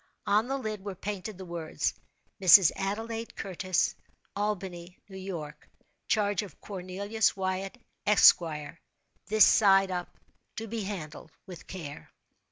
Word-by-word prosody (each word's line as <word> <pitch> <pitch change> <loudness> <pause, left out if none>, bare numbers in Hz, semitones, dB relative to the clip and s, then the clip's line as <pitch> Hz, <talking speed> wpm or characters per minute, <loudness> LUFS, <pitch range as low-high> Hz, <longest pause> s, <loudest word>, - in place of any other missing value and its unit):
On 215 +3 +2
the 270 +1 -1
lid 215 -6 -5
were 200 -2 -5
painted 200 +1 -5
the 190 - -8
words—"Mrs. 175 +2 +3
Adelaide 225 +4 -4
Curtis, 185 -1 -1 0.4
Albany, 190 -4 -4
New 195 - -12
York. 180 -6 -7 0.4
Charge 205 -3 +1
of 195 -8 -11
Cornelius 200 +3 -2
Wyatt, 190 +3 -3 0.3
Esq. 210 0 +8 0.9
This 215 0 +6
side 195 -2 +5
up. 180 -1 -5 0.4
To 225 - -5
be 220 -1 -4
handled 160 -6 -7 0.2
with 175 -4 -11
care." 155 -6 -8
195 Hz, 120 wpm, -29 LUFS, 180-210 Hz, 0.9 s, Esq